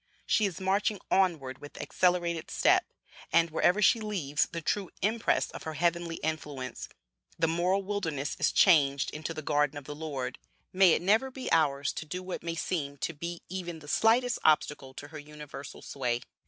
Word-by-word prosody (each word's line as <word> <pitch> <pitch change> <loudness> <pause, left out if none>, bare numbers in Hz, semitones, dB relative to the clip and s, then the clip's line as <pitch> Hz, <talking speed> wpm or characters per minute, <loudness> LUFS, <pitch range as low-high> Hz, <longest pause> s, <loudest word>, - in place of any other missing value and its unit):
She 215 -3 +3
is 185 - -6
marching 195 +2 +1
onward 160 -9 +1
with 145 0 -11
accelerated 175 -2 0
step, - - +3 0.4
and, 165 -1 +4
wherever 180 +6 +3
she 230 - +5
leaves 165 -8 0
the 170 - -3
true 190 +3 -1
impress 225 +3 +1
of - - -8
her 160 -1 -5
heavenly 170 0 0
influence, 145 -4 -4 0.5
the 165 - +2
moral 180 +4 +1
wilderness 165 -8 -2
is - - +3
changed 140 -7 +4
into 155 +1 -5
the 155 -1 -6
garden 145 0 +1
of 145 - -7
the 150 - -6
Lord. 145 -4 -5 0.3
May 185 -2 +6
it - - 0
never 220 +8 +3
be 260 0 -6
ours 145 -3 +2
to - - -5
do 180 +4 -5
what 185 0 -5
may 165 0 -3
seem 145 -4 -2
to 170 - -3
be 170 +3 -6
even 175 -2 -5
the 150 -2 -13
slightest 230 +8 +3
obstacle 150 -3 +2
to 145 - -8
her 155 -1 -8
universal 150 -1 -10
sway. 125 -3 -2
165 Hz, 180 wpm, -29 LUFS, 145-185 Hz, 0.5 s, May